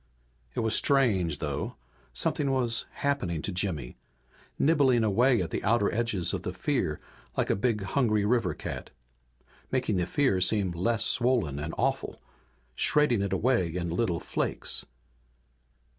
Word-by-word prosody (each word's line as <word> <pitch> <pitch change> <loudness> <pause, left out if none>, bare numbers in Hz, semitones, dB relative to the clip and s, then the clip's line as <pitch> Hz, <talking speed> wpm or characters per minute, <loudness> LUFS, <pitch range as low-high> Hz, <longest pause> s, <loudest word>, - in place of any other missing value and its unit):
It - - 0
was 110 -1 0
strange, 100 - +3
though. 75 -2 -3 0.4
Something 145 -2 -1
was 120 -3 0
happening 95 - -2
to - - -2
Jimmy, 90 -9 -2 0.6
nibbling 135 -6 +3
away 115 +1 +3
at 85 - -6
the - - -3
outer 105 0 +2
edges 105 -7 0
of - - -2
the 90 - -4
fear 95 - -1 0.4
like - - +1
a - - +2
big, 105 -1 0
hungry 105 -1 +1
river 115 -4 +1
cat. - - -6 0.8
Making 125 -6 0
the 90 -1 0
fear 130 -11 +1
seem 95 0 +2
less 110 +6 0
swollen 120 - +2
and 75 +2 -4
awful, - - -1 0.5
shredding 125 - +2
it 100 - -2
away 105 -10 +1
in 85 -2 -2
little 90 -2 0
flakes. - - -3
105 Hz, 145 wpm, -28 LUFS, 90-125 Hz, 0.8 s, strange